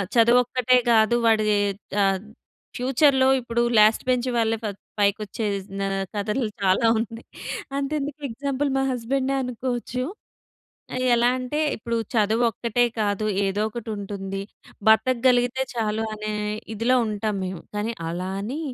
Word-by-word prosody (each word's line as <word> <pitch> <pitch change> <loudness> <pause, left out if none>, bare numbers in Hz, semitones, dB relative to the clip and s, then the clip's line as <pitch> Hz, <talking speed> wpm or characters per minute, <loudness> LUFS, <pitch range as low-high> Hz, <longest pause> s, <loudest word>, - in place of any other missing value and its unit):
చదువు 235 +2 +6
ఒక్కటే 250 0 +2
కాదు 220 +1 +4
వాడి 220 -1 +4 0.6
ఆహ్, 195 -1 +2 0.6
ఫ్యూచర్‌ 265 +3 +3
లో 260 - +5
ఇప్పుడు 235 0 -1 0.2
లాస్ట్ 215 +1 +5
బెంచ్ 250 0 +1
వాళ్ళే 225 0 +2
ఫై 210 - -1 0.3
పైకొచ్చేజ్ 200 -1 0
నా 195 - 0 0.3
కథలు 215 +4 -1
చాలా 190 +4 +3
ఉన్నాయి. 230 +1 -5 0.5
అంతెందుకు 290 +1 -3
ఎగ్జాంపుల్ 275 +3 -2
మా 270 - +2
హస్బాండే 260 +3 -1
అనుకోవచ్చు. 250 0 -3 1.1
ఎలా 240 0 +4
అంటే 255 +4 -4 0.2
ఇప్పుడు 230 +1 -3 0.2
చదువు 220 +2 +2
ఒక్కటే 235 +2 +1
కాదు 205 0 0 0.2
ఏదో 195 +2 -1
ఒకటి 230 0 -7
ఉంటుంది. 195 -1 -5 0.5
బ్రతకగలిగితే 245 +2 +3
చాలు 220 -1 -1
అనే 215 0 -4 0.4
ఇదిలో 240 +4 +2
ఉంటాం 210 0 -2
మేము. 185 -2 -5
కానీ 215 +3 -1 0.2
అలా 180 +2 -3
అని 255 +9 -4
230 Hz, 130 wpm, -24 LUFS, 210-250 Hz, 1.1 s, చదువు